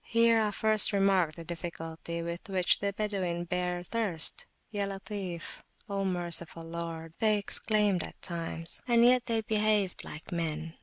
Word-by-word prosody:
Here 230 Hz, -1 st, +4 dB
I 215 Hz, -, +2 dB
first 215 Hz, 0 st, +3 dB
remarked 195 Hz, -5 st, +3 dB
the 165 Hz, -, -8 dB
difficulty 170 Hz, 0 st, -5 dB
with 170 Hz, +5 st, -5 dB
which 185 Hz, -2 st, +3 dB
the 200 Hz, 0 st, 0 dB
Badawin 190 Hz, -4 st, -2 dB
bear 180 Hz, 0 st, -1 dB
thirst. 185 Hz, -5 st, +2 dB, 0.2 s
Ya 205 Hz, -2 st, -1 dB
Latif,O 195 Hz, 0 st, -6 dB
Merciful! 170 Hz, -2 st, -2 dB
(Lord),they 165 Hz, +5 st, -1 dB
exclaimed 205 Hz, -2 st, +1 dB
at -, -, -8 dB
times; 165 Hz, -1 st, -1 dB
and 235 Hz, -1 st, +5 dB
yet 250 Hz, 0 st, +5 dB
they 225 Hz, -2 st, +1 dB
behaved 215 Hz, -3 st, +1 dB
like 155 Hz, -, -9 dB
men. 165 Hz, -1 st, -3 dB
185 Hz, 140 wpm, -30 LUFS, 170-210 Hz, 0.2 s, and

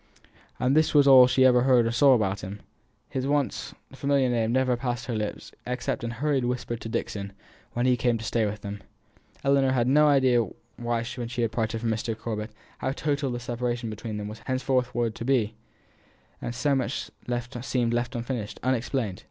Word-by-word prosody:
And 130 Hz, +3 st, +2 dB
this 155 Hz, 0 st, +3 dB
was 145 Hz, -1 st, +6 dB
all 130 Hz, -2 st, +9 dB
she 130 Hz, +1 st, +4 dB
ever 125 Hz, -1 st, +6 dB
heard 125 Hz, -2 st, +4 dB
or 115 Hz, -, 0 dB
saw 135 Hz, +3 st, +6 dB
about 100 Hz, -3 st, 0 dB
him; 100 Hz, +2 st, -8 dB, 0.4 s
his 130 Hz, 0 st, -3 dB
once 145 Hz, -1 st, -1 dB, 0.2 s
familiar 140 Hz, -1 st, +1 dB
name 115 Hz, -2 st, +1 dB
never 130 Hz, 0 st, +2 dB
passed 120 Hz, -1 st, -3 dB
her 125 Hz, -, -3 dB
lips 105 Hz, -2 st, -4 dB, 0.2 s
except 125 Hz, +1 st, -2 dB
in 115 Hz, -, -2 dB
hurried 135 Hz, +3 st, 0 dB
whispers 120 Hz, -1 st, -2 dB
to 115 Hz, -, -7 dB
Dixon, 100 Hz, -2 st, -3 dB, 0.4 s
when 120 Hz, +1 st, 0 dB
he 125 Hz, -1 st, +4 dB
came 120 Hz, -1 st, +1 dB
to 110 Hz, -, -8 dB
stay 115 Hz, -2 st, +1 dB
with 105 Hz, 0 st, -5 dB
them. 100 Hz, 0 st, -6 dB, 0.6 s
Ellinor 140 Hz, -1 st, +3 dB
had 130 Hz, -, +1 dB
had 120 Hz, -, +1 dB
no 150 Hz, +2 st, +5 dB
idea 130 Hz, -4 st, +4 dB, 0.4 s
when 120 Hz, -1 st, -1 dB
she 120 Hz, -1 st, -2 dB
parted 110 Hz, 0 st, -2 dB
from 115 Hz, -1 st, 0 dB
Mr. 110 Hz, 0 st, -2 dB
Corbet 110 Hz, -1 st, -4 dB, 0.3 s
how 130 Hz, -, -1 dB
total 145 Hz, -1 st, -1 dB
the 120 Hz, -1 st, -3 dB
separation 120 Hz, -1 st, -3 dB
between 110 Hz, 0 st, -5 dB
them 105 Hz, 0 st, -4 dB
was 105 Hz, +1 st, -8 dB
henceforward 125 Hz, -3 st, 0 dB
to 115 Hz, -, -7 dB
be, 120 Hz, -4 st, +1 dB, 1.0 s
so 140 Hz, +4 st, 0 dB
much 135 Hz, -1 st, -2 dB, 0.5 s
seemed 120 Hz, -2 st, 0 dB
left 120 Hz, +1 st, -1 dB
unfinished, 120 Hz, -3 st, -4 dB
unexplained. 125 Hz, -5 st, -1 dB
120 Hz, 185 wpm, -26 LUFS, 115-130 Hz, 1.0 s, all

